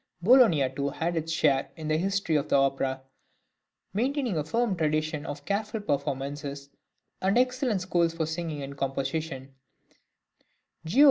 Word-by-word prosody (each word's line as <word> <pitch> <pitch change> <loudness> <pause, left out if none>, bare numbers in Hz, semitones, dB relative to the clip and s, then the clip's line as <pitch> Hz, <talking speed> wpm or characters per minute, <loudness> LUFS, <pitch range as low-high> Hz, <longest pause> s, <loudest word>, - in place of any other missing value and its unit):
Bologna 185 - +6
too 140 +2 -2
had 165 +4 -2
its 160 0 -2
share 135 -4 +2
in 155 -2 -6
the 155 - +2
history 195 -1 0
of 145 - 0
the - - +3
opera, 135 -1 +1 0.9
maintaining 250 - 0
a 155 - 0
firm 225 +5 0
tradition 155 -1 -1
of 145 0 -6
careful 210 +2 -1
performances, 140 -4 -3 0.5
and 195 +4 +2
excellent 250 -5 +1
schools 175 -2 +1
for 165 -1 0
singing 160 -2 -4
and 140 +1 -7
composition; 135 0 -3 1.3
Giov. 195 +12 +1
160 Hz, 140 wpm, -28 LUFS, 140-195 Hz, 1.3 s, Bologna